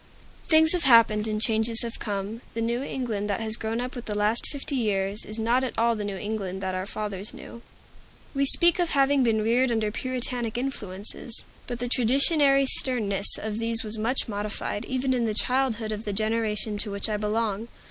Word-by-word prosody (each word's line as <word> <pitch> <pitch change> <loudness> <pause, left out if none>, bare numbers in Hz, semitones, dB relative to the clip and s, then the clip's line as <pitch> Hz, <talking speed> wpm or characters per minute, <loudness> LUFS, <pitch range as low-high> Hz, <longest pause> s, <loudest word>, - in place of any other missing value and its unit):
Things 320 -1 +5
have 360 - 0
happened, 230 -5 +4
and 215 -1 -2
changes 225 +1 +2
have 230 -1 -6
come. 205 +2 -4
The 230 - -3
New 235 +2 -1
England 230 -7 -4
that 200 - -1
has 220 -1 -1
grown 220 +1 -3
up 250 +2 -5
with 245 - -7
the 210 -1 -4
last 210 +3 +1
fifty 285 0 -4
years 205 -3 -1
is 215 - -7
not 235 +3 +1
at 255 - -4
all 230 0 +2
the 210 - -4
New 200 -1 -4
England 200 -3 -4
that 190 0 -2
our 185 +1 -4
fathers 205 -1 -5
knew. 235 - -11 0.7
We 275 -1 +1
speak 345 +5 +7
of 350 -2 +1
having 275 0 +3
been 220 -3 +1
reared 240 +3 +2
under 220 -2 -1
Puritanic 245 -1 -2
influences, 225 -3 -2 0.2
but 245 - -4
the 245 +1 -3
traditionary 275 +3 +3
sternness 215 -7 +3
of 220 0 -5
these 230 0 0
was 215 0 -1
much 240 +5 0
modified, 210 0 -4
even 260 0 -1
in 245 -2 0
the 215 - -2
childhood 245 -3 0
of 215 0 -5
the 205 - -4
generation 215 0 -1
to 210 - +1
which 200 +1 0
I 215 -1 -2
belong. 215 0 -2
225 Hz, 200 wpm, -25 LUFS, 210-250 Hz, 0.7 s, speak